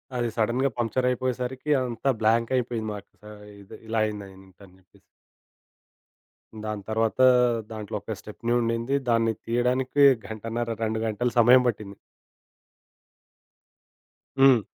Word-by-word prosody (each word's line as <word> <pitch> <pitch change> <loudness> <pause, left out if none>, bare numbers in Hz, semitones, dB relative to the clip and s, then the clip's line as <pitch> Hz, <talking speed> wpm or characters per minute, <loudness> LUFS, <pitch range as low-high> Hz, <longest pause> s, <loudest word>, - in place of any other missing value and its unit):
అది 120 -1 0
సడెన్‌గా 120 +4 +1
పంక్చరైపోయే 125 +2 0
సరికి, 130 +4 -5
అంతా 125 +2 -2
బ్లాంకై 115 +3 +2
యిపోయింది 115 -2 -4
మాకు 100 0 -11
సా 105 - -11 0.3
ఇది 95 - -12
ఇలా 110 0 -1
అయిందేంటి 95 -2 -9
అని 90 - -20
చెప్పేసి. 90 - -26 1.7
దాని 105 -2 -4
తర్వాత, 110 +2 -1 0.5
దాంట్లో 105 -1 -6
ఒక 105 +1 -5
స్టెప్ని 115 +3 -4
ఉండింది. 115 +3 -1 0.2
దాన్ని 115 -1 +2
తీయడానికి 125 +4 +1 0.2
గంటన్నర, 115 +2 -4
2 110 0 -1
గంటలు 120 +3 -1
సమయం 125 +2 +6
పట్టింది. 105 -3 -4 2.4
హ్మ్. 135 -3 +7
115 Hz, 115 wpm, -25 LUFS, 110-125 Hz, 2.4 s, హ్మ్